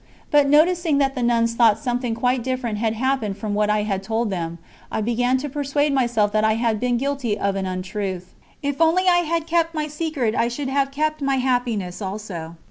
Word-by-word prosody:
But 290 -1 +4
noticing 325 +1 +3
that 275 -1 +2
the 255 - -4
nuns 230 -1 +2
thought 230 -3 +4
something 245 0 -2
quite 250 +2 +1
different 250 -4 -2
had 220 0 0
happened 235 -4 -1
from 215 -2 -3
what 210 0 +1
I 210 0 +2
had 195 -2 -2
told 225 +2 -1
them, 170 -2 -3 0.3
I - - -1
began 245 +3 +1
to 280 +3 -4
persuade 290 +1 0
myself 235 -6 +2
that 215 +1 +1
I 220 0 +3
had 225 -2 0
been 245 0 +1
guilty 270 -5 -1
of 200 -1 -1
an 190 -1 -2
untruth. 185 0 -4 0.3
If 285 +2 -2
only 330 +3 +4
I 355 -1 +6
had 335 -1 0
kept 335 0 0
my 305 -1 -1
secret 300 -6 -2
I 235 - +1
should 265 +3 -4
have 275 0 +1
kept 305 +2 -1
my 275 -1 +1
happiness 245 -8 -1
also. 190 -5 -6
245 Hz, 210 wpm, -22 LUFS, 210-280 Hz, 0.3 s, I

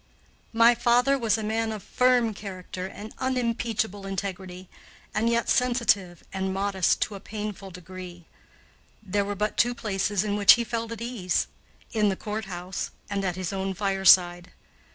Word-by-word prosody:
My 230 +1 +6
father 245 +3 +3
was 230 -5 +1
a 220 - -4
man 220 +1 -1
of 215 -3 -6
firm 250 -3 +2
character 185 -2 -7
and 210 +3 -9
unimpeachable 230 -5 -1
integrity, 190 -1 -5 0.5
and 225 +2 +1
yet 235 0 +1
sensitive 235 -8 +1
and 190 0 -2
modest 195 -1 +1
to - - -6
a 200 - -7
painful 210 -1 -6
degree. 180 -1 -10 0.8
There 200 0 0
were 205 +1 -3
but 210 +2 -2
two 240 +1 +3
places 205 -3 -1
in 205 -1 -1
which 200 -1 +9
he 240 - 0
felt 230 -1 -4
at 230 - -6
ease 230 -7 -1 0.5
in 210 -2 +3
the 190 - 0
courthouse 190 -4 -5 0.2
and 200 -1 -1
at 180 -2 -1
his 185 0 -4
own 190 0 -2
fireside. 185 -3 +4
205 Hz, 155 wpm, -26 LUFS, 190-230 Hz, 0.8 s, which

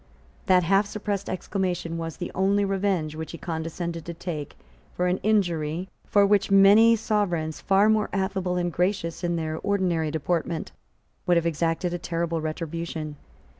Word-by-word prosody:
That 185 -1 +5
half 195 +4 +3
suppressed 205 -1 -3
exclamation 180 -3 -2
was 165 -2 -5
the 175 - -5
only 200 +2 +2
revenge 195 -5 0
which 160 +1 -6
he - - -6
condescended 165 0 -4
to 170 - -6
take 160 -4 -6 0.4
for 180 - 0
an 180 +1 +1
injury 175 -4 0 0.2
for 205 -1 +4
which 200 0 +3
many 200 +4 +7
sovereigns, 180 -8 -1
far 195 +1 +4
more 220 -1 +2
affable 190 -1 -1
and 175 -1 -1
gracious 180 -2 -1
in 175 0 0
their 160 -1 -3
ordinary 180 -6 0
deportment, 160 +1 -2 0.6
would 175 -1 +4
have 170 - +1
exacted 165 +2 0
a 175 - -3
terrible 170 -1 -2
retribution. 160 -1 -4
175 Hz, 155 wpm, -25 LUFS, 165-195 Hz, 0.6 s, many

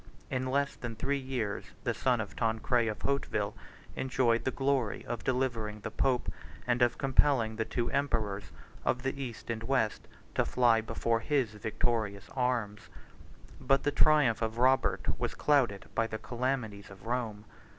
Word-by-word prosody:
In 130 0 -1
less 140 +1 +1
than 120 -2 -6
three 140 +5 0
years, 125 -6 -2 0.2
the - - +1
son - - +1
of - - -4
Tancred 115 +1 +1
of 110 - -4
Hauteville 140 0 0 0.4
enjoyed 125 -3 +1
the - - +3
glory 135 -5 0
of 120 -2 -4
delivering 120 -5 -1
the - - -5
pope, 130 -2 +1 0.4
and 120 0 +1
of 120 -1 +4
compelling 130 -4 +3
the 110 - 0
two 120 +1 -1
emperors, 110 -8 0 0.4
of 125 - 0
the 135 +1 -2
East 120 -3 -5
and 110 -1 -3
West, 115 -3 0 0.3
to - - +2
fly 120 -3 +3
before 115 +1 0
his 130 -2 +1
victorious 105 -1 -2
arms. 120 -6 -1 0.7
85 - - -15
But 135 0 +4
the 145 - +2
triumph 145 -7 +4
of 110 0 -1
Robert 130 +2 +2
was - - -2
clouded 125 -10 +2
by 115 - +1
the 110 - -4
calamities 120 -4 -3
of 95 0 -13
Rome. 115 -3 -2
120 Hz, 160 wpm, -31 LUFS, 110-130 Hz, 0.7 s, of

